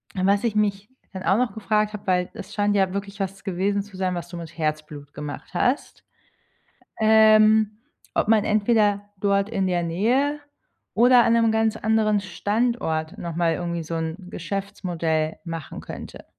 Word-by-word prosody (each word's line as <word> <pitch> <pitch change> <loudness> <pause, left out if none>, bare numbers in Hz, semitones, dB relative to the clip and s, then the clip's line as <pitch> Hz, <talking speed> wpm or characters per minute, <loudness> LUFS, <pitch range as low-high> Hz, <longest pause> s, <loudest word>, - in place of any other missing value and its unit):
was 200 +2 +2
ich 230 -3 0
mich 205 -1 0 0.2
dann 190 -1 -6
auch 195 - +3
noch 250 0 0
gefragt 215 0 0
habe, 210 -1 -8
weil 180 -1 +1
es 205 - -9
scheint 205 -1 +1
ja 190 -2 +2
wirklich 200 0 -5
was 195 0 -4
gewesen 200 +1 0
zu 205 -1 -15
sein, 185 -1 -1
was 175 -1 -5
du 175 - -7
mit 165 -1 -9
Herzblut 155 -2 -4
gemacht 150 +3 -7
hast, 250 +10 -1 1.0
ähm, 215 -1 +5 0.4
ob - - +1
man 215 -1 +4
entweder 210 -1 +2
dort 200 0 +1
in 195 -4 0
der 175 -1 0
Nähe 245 - +1 0.5
oder 245 +1 +6
an 230 - +3
'nem 230 -1 +3
ganz 220 0 +1
anderen 220 -1 +2
Standort 200 -3 -1
noch 170 -5 -5
mal 170 -1 +2
irgendwie 170 0 -3
so 165 +1 -5
'n 160 0 -2
Geschäftsmodell 170 -5 -3
machen 165 -3 -6
könnte. - - -9
200 Hz, 165 wpm, -24 LUFS, 175-215 Hz, 1.0 s, oder